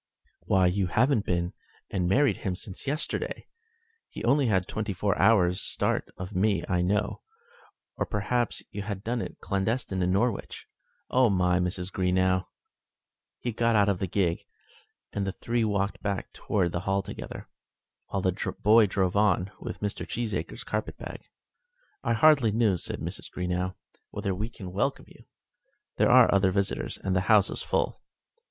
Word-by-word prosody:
"Why, 95 -1 +4
you 90 +1 +2
haven't 120 +4 +2
been 85 0 0 0.4
and 90 -3 0
married 140 +7 +3
him 95 -3 -2
since 95 +7 -7
yesterday? 150 +4 -3 0.6
He - - -8
only 135 +3 +3
had 95 -4 +1
twenty 110 -2 -3
four 100 +2 0
hours' 90 -5 +4
start - - 0
of 90 +3 -7
me, 95 -2 +2
I 90 -2 +1
know. 100 +3 0 0.8
Or, - - -1
perhaps, 115 +3 -1
you 105 - -4
had 100 0 -3
it 95 - -18
done 120 +2 -3
clandestine 100 0 -1
in 90 0 +2
Norwich? 100 +2 -1 0.5
Oh, 125 -2 +5
Mrs. 90 0 +1
Greenow!" 95 0 +1 0.9
He 120 - -1
got 115 +1 +1
out 105 -1 +4
of 95 -3 0
the 95 - -1
gig, 90 -2 0 0.7
and 100 -1 -1
the 95 - -2
three 115 +2 -1
walked 100 -2 -1
back 100 -2 -3
towards 90 -5 0
the 85 - -2
Hall 95 +2 0
together, - - -8 0.6
while 95 -2 -2
the 95 +2 -1
boy 110 +1 +6
drove 95 -1 0
on 100 -2 +2
with - - -7
Mr. 105 -1 -3
Cheesacre's 115 -2 -3
carpetbag. - - -5 0.8
"I 115 -3 +1
hardly 140 -1 +5
know," 110 -3 +3
said 85 - -5
Mrs. - - -5
Greenow, 90 +1 -2 0.3
"whether 100 - -2
we 105 +5 -3
can 95 -6 -9
welcome 135 +8 -1
you. - - -17 0.7
There - - +4
are - - +7
other 95 -1 +4
visitors, 100 +1 -1
and 95 -1 -2
the 95 - +3
house 105 -3 +5
is - - -2
full." - - -1
100 Hz, 160 wpm, -28 LUFS, 95-110 Hz, 0.9 s, are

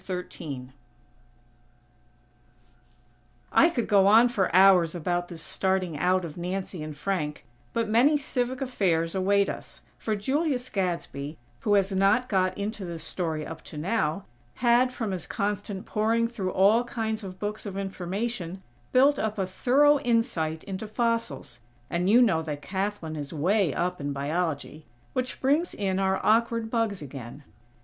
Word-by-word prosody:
XIII 160 -8 -6 2.8
I 335 - +6
could 245 -9 -1
go 195 -2 +5
on 225 +4 +7
for 205 -6 0
hours 185 -3 +6
about 175 +1 -1
this 170 -2 -8
starting 190 -3 0
out 185 +2 +2
of 160 0 -8
Nancy 180 0 -4
and 155 -1 -6
Frank, 150 -4 -3 0.3
but 230 -1 -1
many 250 +8 +4
civic 255 -2 -2
affairs 175 -10 0
await 200 +1 +2
us; - - -7 0.2
for 220 - -1
Julius 265 +3 -1
Gadsby 170 -6 -3 0.2
who 205 -1 +2
has 200 0 +2
not 200 +7 +2
got 185 -2 +1
into 205 0 -4
this 170 -3 -5
story 160 -3 -2
up 160 +1 -8
to 155 - -9
now, 170 +1 -1 0.3
had, 245 +1 +3
from 225 -5 -3
his 185 -2 -4
constant 205 -1 -3
poring 225 +2 +1
through 200 -6 -3
all 205 +6 +4
kinds 220 -2 -3
of 185 -1 -7
books 210 +2 -4
of 195 -1 -5
information, 190 0 -4 0.3
built 275 +3 +5
up 215 -1 -2
a 190 - 0
thorough 280 +10 +4
insight 230 - 0
into 195 +2 -5
fossils; 225 - -2 0.3
and 175 +2 +1
you 240 +4 +7
know 185 -9 +2
that 150 -2 -5
Kathlyn 190 -4 -3
is 145 -2 -6
way 180 +3 +2
up 180 +2 -2
in 140 0 -2
Biology; 155 +1 -3 0.3
which 255 0 -2
brings 295 +6 +1
in 190 -2 -1
our 190 0 +1
awkward 230 0 +2
"bugs" 220 -7 0
again. 135 0 -9
195 Hz, 150 wpm, -27 LUFS, 170-230 Hz, 2.8 s, on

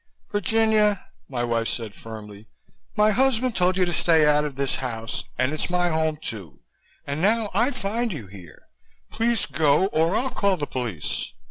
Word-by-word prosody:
"Virginia," 215 -1 +2 0.2
my 125 -3 -2
wife 115 -1 0
said 115 -4 -4
firmly, 105 -1 -10 0.5
"my 210 +1 +5
husband 255 0 +2
told 180 +1 +2
you 185 - +3
to 175 - -2
stay 160 -1 +4
out 150 0 +4
of 145 -3 -4
this 135 -1 -1
house 115 -4 -4
and 130 +3 +1
it's 155 - -1
my 175 0 +1
home, 160 -1 0
too 100 - -7 0.4
and 140 +2 -3
now 215 +2 +2
I 235 +7 +3
find 235 -2 -2
you 145 - -6
here. 95 -4 -14 0.5
Please 230 -2 +1
go 155 +3 +3
or 165 +5 +2
I'll 260 +3 0
call 200 -6 +1
the 145 - -2
police." 120 - -4
160 Hz, 170 wpm, -24 LUFS, -, 0.5 s, my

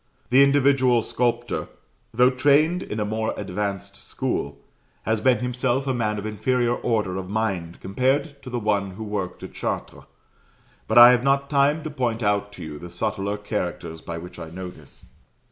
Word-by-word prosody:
The 130 +2 +7
individual 135 -4 +4
sculptor, 120 0 -1 0.4
though 125 +3 +4
trained 145 +7 +3
in 110 - -5
a 105 - 0
more 110 +1 -2
advanced 100 0 -4
school, 70 0 -3 0.5
has 110 -1 0
been 130 0 +4
himself 125 +2 -1
a 135 - 0
man 105 -3 -1
of 105 - -5
inferior 120 +3 0
order 105 -6 -1
of 95 -1 -5
mind 95 -6 -2
compared 135 - 0
to 130 - -9
the 125 - -3
one 100 -4 0
who 110 - -6
worked 100 -4 -4
at - - -8
Chartres. - - -4 0.8
But 110 - +1
I 120 +1 +11
have 125 -1 +3
not 140 +1 +1
time 145 +2 +3
to 155 - -5
point 120 -5 -1
out 105 0 +1
to - - -9
you 75 -2 -7
the 90 - -9
subtler 100 +2 -2
characters 90 -6 -4
by 85 - -6
which 90 +2 -9
I 80 - -7
know 90 +2 -6
this. - - -17
110 Hz, 180 wpm, -24 LUFS, 100-130 Hz, 0.8 s, I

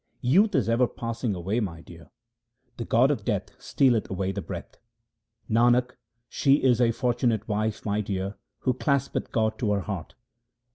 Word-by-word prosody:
Youth 190 - +4
is 105 - +2
ever 120 +2 +3
passing 115 -2 -3
away, 95 +6 -1
my 85 -7 -4
dear, - - -14 0.7
the - - -4
god - - +4
of - - -2
death - - -1
stealeth 125 -6 +2
away 95 0 -2
the - - -4
breath. - - -8 0.7
Nanak, 120 +2 +3 0.4
she 135 +2 +2
is 125 -4 +2
a 120 - +4
fortunate 115 -2 0
wife, 110 0 -2
my 105 0 0
dear, 100 -1 -3 0.3
who 130 - +1
claspeth 140 +1 -1
God 110 -1 0
to 105 -4 0
her 100 - 0
heart. 95 -5 -6
115 Hz, 160 wpm, -26 LUFS, 100-125 Hz, 0.7 s, Youth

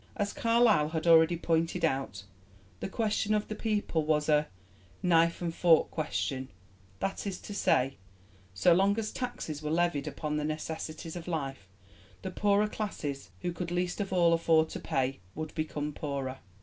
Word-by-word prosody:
As 205 -4 -1
Carlyle 230 -9 +3
had 160 0 -3
already 165 0 +6
pointed 165 +1 +1
out, 135 -10 -2 0.6
the - - -4
question 215 0 0
of 210 - -1
the - - -4
people 210 -8 0
was 150 0 +1
a 150 0 +4 0.6
'knife 170 -1 +3
and 170 -1 -1
fork' 165 -2 +4
question 135 -4 -2 0.5
that 195 - -2
is 190 -2 -4
to 205 - -7
say, 135 -8 +2 0.6
so 100 - +5
long 195 +4 +3
as 220 -1 -2
taxes 245 - -4
were 150 - -3
levied 165 -3 +1
upon 150 -1 -3
the 150 - -1
necessities 155 +1 -4
of 175 -1 -7
life, 135 - -3 0.6
the 190 - -4
poorer 205 +2 +2
classes, 155 -11 -4
who 180 - -1
could 175 0 -4
least 180 +2 -1
of 195 - -3
all 170 -2 +4
afford 160 -1 +3
to - - -5
pay, 135 0 -1 0.2
would 155 0 -5
become 150 -2 -3
poorer. 135 -3 -4
165 Hz, 165 wpm, -30 LUFS, 150-190 Hz, 0.6 s, already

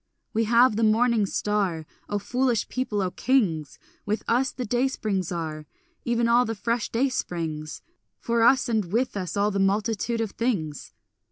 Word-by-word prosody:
We 225 +1 +1
have 235 0 +4
the 225 - +1
morning 220 -1 +3
star, 190 -6 -1 0.2
O 205 - 0
foolish 245 +2 0
people, 220 -6 -1
O 180 - -2
kings! 180 - 0 0.3
With 210 +2 -2
us 250 +3 +2
the 250 - -5
day 245 +4 +1
springs 200 -9 -2
are, 155 -3 -4 0.4
Even 235 -1 +1
all 240 +1 +5
the 225 -2 -3
fresh 230 +2 -1
day 250 +4 +1
springs; 160 - -4 0.3
For 235 0 0
us, 245 +2 +5
and 220 -4 +1
with 240 +3 0
us, 185 -2 -4
all 205 +1 +2
the 200 - -1
multitudes 215 +3 0
of 215 - -5
things. 175 - -3
220 Hz, 170 wpm, -25 LUFS, 195-240 Hz, 0.4 s, all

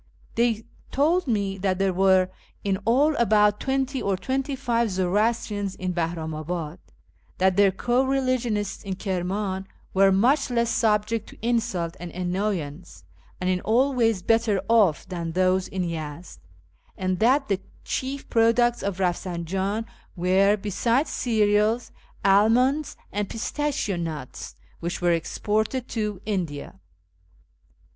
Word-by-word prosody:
They 230 -2 +1 0.2
told 325 +5 +2
me 200 -4 -1
that 190 -1 0
there 195 -1 +1
were 190 0 +4 0.3
in 195 -1 +1
idl 285 +6 +4
about 210 -2 +4
twenty 270 0 -1
or 195 -1 0
twenty 270 +6 -2
five 235 -4 0
Zoroastrians 205 +2 0
in 185 -1 -3
Bahramabad; 165 0 -3 0.6
that 190 0 +3
their 200 0 +5
co 240 +6 +1
religionists 255 -6 0
in 195 -2 -3
Kirman 190 +1 -2 0.3
were 195 0 +5
much 255 +9 +3
less 235 -1 +1
subject 215 -1 +1
to - - -14
insult 220 -8 0
and 175 - -6
annoyance, 180 - -3 0.4
and 180 - -2
in 185 -1 +1
all 255 +5 +2
ways 225 -6 +1
better 225 -2 +2
off, 210 -9 +3
than 170 -3 -4
those 185 +1 +2
in 190 -1 -3
Yezd; 165 -1 -6 0.6
and 185 -1 -1
that 265 +5 +3
the 195 -2 0 0.2
chief 270 +1 -3
products 235 +1 +3
of 200 -2 -2
Eafsinjan 190 +3 -1 0.3
were, 190 +3 +3
besides 230 - 0
cereals, 215 0 +1 0.3
almonds 240 +9 +3
and 205 0 -2
pistachio 245 -4 -2
nuts, 155 -6 -6 0.2
which 170 +1 -3
were 175 -1 +2
exported 215 +8 -1
to 210 -4 -2
India. 170 - -3
205 Hz, 125 wpm, -25 LUFS, 185-235 Hz, 0.6 s, their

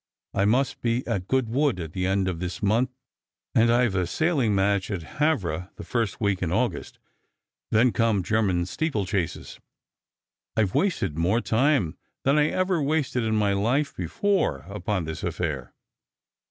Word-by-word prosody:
I 100 0 +2
must 130 +5 +1
be 120 +1 0
at 100 -6 -2
Goodwood 130 -2 +1
at 80 -2 -6
the 90 -1 -1
end 95 0 +1
of 90 -3 -2
this 90 +3 -5
month, 115 +5 +2 0.6
and 115 +1 +4
I've 120 -3 +3
a 90 -2 0
sailing 135 - +1
match 100 0 +1
at 95 -5 -3 0.2
Havre 95 - 0
the - - -8
first 115 -5 -2
week 100 -3 0
in 85 -3 -1
August; - - -1 0.7
then 115 +3 +4
come 110 -5 +1
German 95 -3 +1
steeplechases. 100 - -2 1.0
I've 105 -4 +2
wasted 95 - 0
more 95 +8 +2
time 120 - +1 0.2
than 140 +3 +3
I 150 - +4
ever 185 -1 0
wasted 145 -3 0
in 110 -1 0
my 105 -2 +2
life 125 +9 0
before 90 - 0
upon 100 -2 -2
this 80 +1 -5
affair." 80 -7 -3
105 Hz, 155 wpm, -25 LUFS, 90-130 Hz, 1.0 s, and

